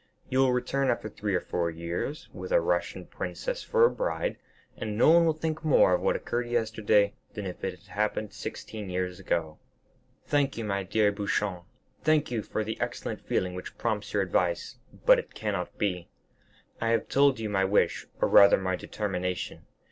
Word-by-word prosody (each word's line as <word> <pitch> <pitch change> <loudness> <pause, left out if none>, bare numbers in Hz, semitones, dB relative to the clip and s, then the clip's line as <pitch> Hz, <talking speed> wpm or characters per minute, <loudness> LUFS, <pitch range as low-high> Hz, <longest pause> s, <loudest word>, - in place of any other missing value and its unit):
You 130 - +1
will 135 -1 +5
return 130 +2 0
after 110 - 0
three 100 -1 -2
or - - +3
four 85 -1 -1
years 85 - -4
with - - -7
a - - +5
Russian - - -1
princess - - -4
for 470 0 +4
a - - +5
bride, - - -2 0.4
and 105 -1 -4
no 125 - +6
one 170 0 +6
will 160 - +3
think 155 0 -3
more 145 - +5
of 90 - +2
what - - +2
occurred 120 0 -2
yesterday 110 -3 +2 0.2
than 105 - -4
if 90 - -7
it - - 0
had - - -23
happened 105 0 -1
sixteen 110 -1 -6
years 90 0 -2
ago." 80 -2 -2 0.7
"Thank 140 -3 +1
you, 115 - -3
my 100 -2 -1
dear 105 +2 +2
Beauchamp, 100 -3 -2 0.4
thank 155 -3 +2
you 115 -3 0
for 110 - -3
the 110 +1 -5
excellent - - -3
feeling 90 -1 -1
which 90 - -8
prompts 110 -3 -2
your 100 -1 +2
advice; 90 -2 -1 0.3
but - - +7
it - - -9
cannot 100 -5 -3
be. 90 -4 -2 0.7
I 115 - 0
have 115 -1 +1
told 140 -3 +4
you 110 - -2
my 95 -2 +1
wish, 95 +2 +1
or - - +3
rather 100 - +7
my 95 -1 -1
determination. 90 -2 -4
105 Hz, 185 wpm, -28 LUFS, 95-130 Hz, 0.7 s, but